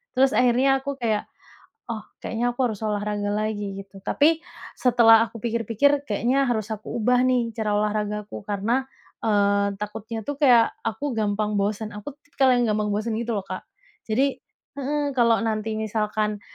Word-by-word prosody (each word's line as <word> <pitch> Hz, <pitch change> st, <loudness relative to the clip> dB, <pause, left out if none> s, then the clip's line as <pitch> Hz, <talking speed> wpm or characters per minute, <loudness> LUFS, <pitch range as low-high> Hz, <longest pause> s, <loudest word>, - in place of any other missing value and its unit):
Terus 265 Hz, +1 st, +4 dB
akhirnya 255 Hz, +2 st, +4 dB
aku 280 Hz, +1 st, -4 dB
kayak, 220 Hz, -3 st, 0 dB, 0.6 s
"Oh 220 Hz, -2 st, -4 dB, 0.2 s
kayaknya 240 Hz, +2 st, -1 dB
aku 250 Hz, 0 st, +1 dB
harus 215 Hz, -3 st, -5 dB
olahraga 205 Hz, -1 st, -1 dB
lagi." 205 Hz, -2 st, -2 dB
gitu, 195 Hz, 0 st, -15 dB
tapi 315 Hz, +2 st, +3 dB, 0.4 s
setelah 230 Hz, -2 st, +6 dB
aku 230 Hz, -, -10 dB
pikir-pikir 235 Hz, +5 st, +1 dB
kayaknya 245 Hz, +6 st, +1 dB
harus 220 Hz, -3 st, -1 dB
aku 215 Hz, 0 st, -6 dB
ubah 250 Hz, +3 st, +3 dB
nih 245 Hz, -3 st, +1 dB
cara 215 Hz, -2 st, -1 dB
olahraga 210 Hz, 0 st, -1 dB
aku -, -, -7 dB
karena, 210 Hz, +6 st, 0 dB, 0.4 s
eee, 200 Hz, -1 st, +2 dB
takutnya 220 Hz, +2 st, -5 dB
tuh 290 Hz, -, -4 dB
kayak 245 Hz, -5 st, +5 dB
aku 230 Hz, +5 st, -2 dB
gampang 210 Hz, 0 st, 0 dB
bosen, 210 Hz, +2 st, -2 dB
aku 210 Hz, +7 st, -7 dB
tipikal 275 Hz, -2 st, +1 dB
yang 245 Hz, -, +2 dB
gampang 210 Hz, 0 st, 0 dB
bosen 215 Hz, +2 st, -1 dB
gitu 235 Hz, +1 st, -2 dB
loh 195 Hz, -, -3 dB
Kak. 185 Hz, -1 st, -6 dB, 0.4 s
Jadi 265 Hz, +5 st, +1 dB, 0.3 s
heeh, 285 Hz, +1 st, -2 dB
kalau 235 Hz, -2 st, +4 dB
nanti 220 Hz, 0 st, -1 dB
misalkan, 215 Hz, -1 st, -1 dB
220 Hz, 160 wpm, -24 LUFS, 210-250 Hz, 0.6 s, setelah